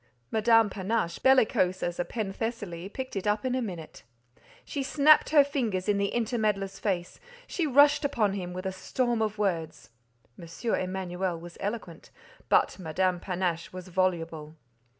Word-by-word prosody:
Madame 225 0 +4
Panache, 195 -2 -2
bellicose 220 -8 +3
as 175 0 -3
a - - +2
Penthesilea, 200 -4 -4
picked 260 +2 -6
it 195 +1 -2
up 210 +3 +1
in 255 - 0
a 260 - 0
minute. 175 -8 -7 0.6
She 285 - -3
snapped 290 +3 +5
her 300 -2 +7
fingers 235 -10 -2
in 205 -1 +2
the 200 - +1
intermeddler's 215 -4 -1
face; 180 -4 -2 0.3
she 335 -4 -2
rushed 285 +2 +5
upon 215 -8 +1
him 180 -3 -4
with 185 +1 -6
a 190 - -1
storm 235 +5 -1
of 215 -1 -1
words. 165 - -2 0.5
M. 170 +8 -4
Emanuel 185 -1 -2
was 175 +1 -11
eloquent; 200 -5 -5 0.4
but - - +3
Madame 180 +2 0
Panache 175 -2 -2
was 185 0 -9
voluble. 165 -4 -1
195 Hz, 150 wpm, -28 LUFS, 180-230 Hz, 0.6 s, her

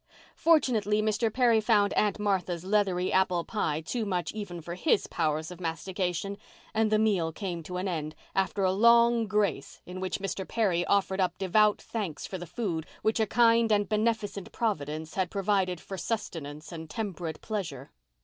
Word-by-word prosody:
Fortunately, 230 -10 +3
Mr. 215 +1 +1
Perry 235 -2 +4
found 210 -2 +3
Aunt 210 -2 +2
Martha's 190 -4 -1
leathery 190 -3 +1
apple 185 -2 +2
pie 160 -8 -1
too 230 +8 -3
much 180 -4 -1
even 200 -5 -6
for 170 +1 -6
his 200 - +2
powers 155 0 -1
of 180 0 -10
mastication 180 +3 -3 0.3
and 220 -1 +2
the 215 - +4
meal 200 -7 +2
came 175 -1 -4
to 180 +3 -6
an 185 +2 -2
end, 155 -4 -3 0.2
after 195 +1 0
a 185 - +3
long 235 +2 +5
grace 200 -8 -1
in 180 +1 -7
which 185 0 -2
Mr. 195 -1 -4
Perry 185 -7 +1
offered 195 -1 +2
up 180 -1 0
devout 210 +2 +3
thanks 200 -9 -4
for 190 - -5
the 175 - -7
food 165 -5 -3 0.2
which 220 +1 +1
a 220 - +2
kind 230 0 +4
and 205 -1 +3
beneficent 215 -3 -1
Providence 155 -8 -2
had 185 -2 0
provided 195 -3 0
for 195 +2 -7
sustenance 160 -8 -4
and 160 -2 -7
temperate 175 -6 -4
pleasure. 175 - -5
195 Hz, 170 wpm, -29 LUFS, 175-215 Hz, 0.3 s, long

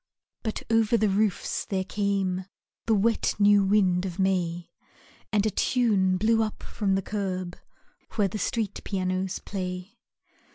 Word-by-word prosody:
But 220 - -3
over 225 0 +4
the 215 -1 +2
roofs 200 0 0
there 190 -2 -2
came 195 -2 -1 0.4
The 225 - +4
wet 220 +3 +1
new 205 -1 +5
wind 190 -3 +3
of 185 -2 -4
May, 175 -3 0 0.6
And 210 -1 +2
a 215 - +2
tune 200 -6 +2
blew 225 +3 +3
up 215 -1 -3
from 195 -2 -1
the 195 - -1
curb 185 -4 -3 0.6
Where 210 -3 +2
the 210 +3 -5
street 210 0 -2
pianos 185 -1 -1
play. 180 0 -6
195 Hz, 140 wpm, -27 LUFS, 185-215 Hz, 0.6 s, new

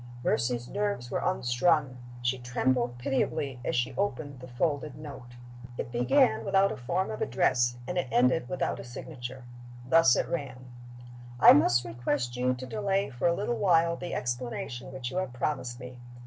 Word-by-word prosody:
Mercy's 120 +1 0
nerves 200 -12 -2
were - - 0
unstrung. 130 +1 +1 0.2
She 125 +1 0
trembled 125 0 0
pitiably 135 +1 -1
as - - -1
she 120 - 0
opened 150 -9 -2
the 125 - -10
folded 145 +2 -1
note. 140 -5 -10 0.4
It - - -4
began 120 -2 +3
without 195 0 +3
a - - -3
form 170 +8 -2
of 110 - -6
address, 120 0 +2
and 180 +6 -2
it 175 - -2
ended 125 +3 +2
without 180 - -2
a - - -6
signature. 125 0 -8 0.4
Thus 130 -4 +6
it - - 0
ran: 130 -6 -5 0.7
"I - - +10
must 120 -4 +4
request 120 +2 -2
you 125 +1 +1
to 130 +1 -7
delay 195 +4 -1
for 120 +5 0
a 170 - +3
little 210 +5 -2
while 170 -3 +3
the 175 0 -5
explanation 120 0 -4
which 130 -2 -5
you - - -4
have 185 -10 -2
promised 125 -2 -3
me. 125 0 -9
130 Hz, 170 wpm, -29 LUFS, 120-160 Hz, 0.7 s, I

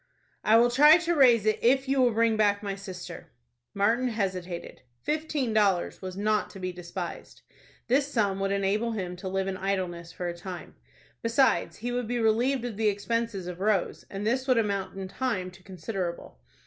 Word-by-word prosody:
"I 220 +1 +6
will 240 +1 +4
try 295 +6 +8
to 345 0 0
raise 245 -8 +5
it, 215 - +2
if 265 +3 +3
you 270 0 +2
will 250 - +5
bring 225 0 +2
back 205 -1 +2
my 200 -1 -2
sister." 185 -3 -8 0.5
Martin 225 +6 +2
hesitated. 185 -6 -4 0.2
Fifteen 300 -6 -1
dollars 200 -5 +1
was 185 -1 -6
not 215 +1 +1
to 195 - -11
be 185 0 -3
despised. 175 0 -7 0.4
This 275 +3 +2
sum 200 -6 +1
would 195 0 0
enable 200 +4 0
him 180 -4 -4
to 190 +1 -7
live 190 0 -1
in 190 -1 -3
idleness 185 -3 -3
for 175 +2 -5
a 170 - -4
time. 175 0 -8 0.5
Besides 235 +4 +2
he 240 +3 -4
would 245 -1 -2
be 245 +1 -1
relieved 240 +3 +2
of 230 -4 -5
the 220 -1 +1
expenses 210 -1 -2
of 180 0 -6
Rose, 200 -2 0
and 195 +1 -5
this 260 +4 0
would 255 -2 +4
amount 200 -4 -1
in 190 -1 -4
time 185 -4 -2
to 190 +1 -17
considerable. 185 - -5
205 Hz, 185 wpm, -27 LUFS, 185-235 Hz, 0.5 s, try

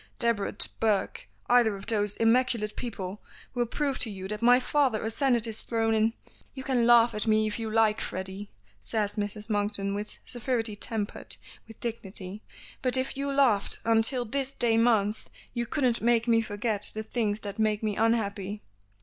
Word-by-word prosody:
Debrett 230 -4 0
Burke 225 - 0 0.2
either 240 -4 +4
of 195 0 -9
those 210 -3 0
immaculate 225 -2 +2
people 205 -5 -5 0.3
will 240 -1 0
prove 280 +2 -2
to 230 - +3
you 190 -2 -6
that 210 +2 -5
my 245 +1 +6
father 260 -3 +1
ascended 235 +1 +1
his 225 -2 -4
throne 225 -1 0
in 220 +1 +2 0.2
" - - -30
"You 265 - -6
can 250 -3 +1
laugh 235 0 +6
at 215 +2 -3
me 215 0 +3
if 215 +2 -3
you 225 -1 -3
like, 215 -1 +2
Freddy," 190 +2 -5 0.3
says 205 - -2
Mrs. 210 0 -4
Monkton 205 -2 0
with 210 +1 -5
severity 240 -3 -2
tempered 210 0 -4 0.3
with 225 - -13
dignity; 205 -4 -4 0.4
"but 255 0 +1
if 260 +1 -2
you 280 +1 -2
laughed 255 -8 +2
until 230 +3 +4
this 270 +3 -2
day 235 -3 +1
month 225 -2 +2 0.2
you 235 -1 -2
couldn't 255 -4 0
make 235 0 +2
me 230 -1 +4
forget 210 -1 +1
the 220 - -3
things 215 -2 -2
that 205 +1 -6
make 215 0 +1
me 210 -2 0
unhappy." 210 -2 0
225 Hz, 175 wpm, -28 LUFS, 210-240 Hz, 0.4 s, my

